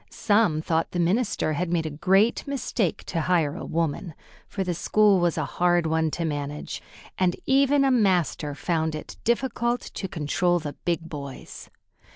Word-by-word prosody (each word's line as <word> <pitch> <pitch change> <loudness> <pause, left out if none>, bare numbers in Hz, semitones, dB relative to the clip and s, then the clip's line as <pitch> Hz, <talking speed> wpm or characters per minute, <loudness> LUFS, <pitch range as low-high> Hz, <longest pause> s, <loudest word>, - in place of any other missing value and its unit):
Some 205 -8 +2
thought 165 0 0
the 175 - -1
minister 180 -2 +1
had 170 +3 -2
made 165 -2 +1
a 155 - -3
great 195 - +2
mistake 240 - -1
to 165 - -2
hire 160 -4 +1
a - - -6
woman, 165 0 -2 0.3
for 195 - -3
the 180 -1 -1
school 205 +3 +3
was 175 -2 +1
a - - 0
hard 175 -1 +1
one 160 0 +1
to 170 - -1
manage, 145 -1 -4 0.4
and 180 -2 +2
even 275 +1 +4
a 270 - +3
master 180 - +1
found 160 +1 -1
it 155 - -8
difficult 240 0 0
to 190 - -6
control 175 +2 0
the 150 -4 -5
big 165 -2 -3
boys. 140 -4 -8
175 Hz, 170 wpm, -25 LUFS, 160-205 Hz, 0.4 s, even